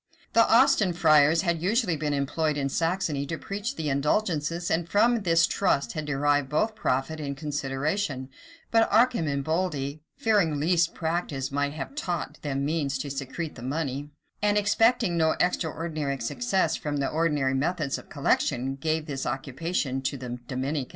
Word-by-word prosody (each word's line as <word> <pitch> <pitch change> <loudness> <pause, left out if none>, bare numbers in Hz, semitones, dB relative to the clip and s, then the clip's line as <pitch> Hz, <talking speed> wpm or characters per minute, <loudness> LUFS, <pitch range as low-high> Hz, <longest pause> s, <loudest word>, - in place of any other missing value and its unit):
[] - - -32
The 230 - +5
Austin 225 -6 +5
friars 160 -1 +5
had 170 -3 0
usually 200 -1 +1
been 150 -1 -2
employed 150 +2 0
in 140 -1 -1
Saxony 165 -2 0
to 165 - -3
preach 205 - -4
the 155 - -3
indulgences, 160 +3 0
and 165 +1 0
from 235 +4 +4
this 165 -3 +4
trust 160 -8 0
had 155 -2 -4
derived 145 -1 +1
both 215 +10 +1
profit 155 -4 -1
and 140 -2 -4
consideration: 145 +1 -2 0.4
but 225 0 +4
Arcemboldi, 160 - +1 0.2
fearing 205 - +2
lest 170 +2 +2
practice 160 -5 -2
might 145 +1 -1
have 150 - -6
taught 175 - -4
them 140 -2 -2
means 145 -3 -1
to 140 +1 -5
secrete 140 +4 -4
the 115 - -11
money,[] 140 +1 -3 0.3
and 205 0 +2
expecting 210 -1 +3
no 160 -1 +3
extraordinary 160 -5 -1
success 185 - 0
from 145 -1 -3
the 140 -1 0
ordinary 150 -4 +1
methods 150 +1 -1
of - - -16
collection, 135 +3 0
gave 155 +1 -1
this 140 -4 -4
occupation 135 +1 -2
to 140 +1 -2
the 125 -1 -6
Dominicans. 135 +1 -2
155 Hz, 155 wpm, -27 LUFS, 140-175 Hz, 0.4 s, The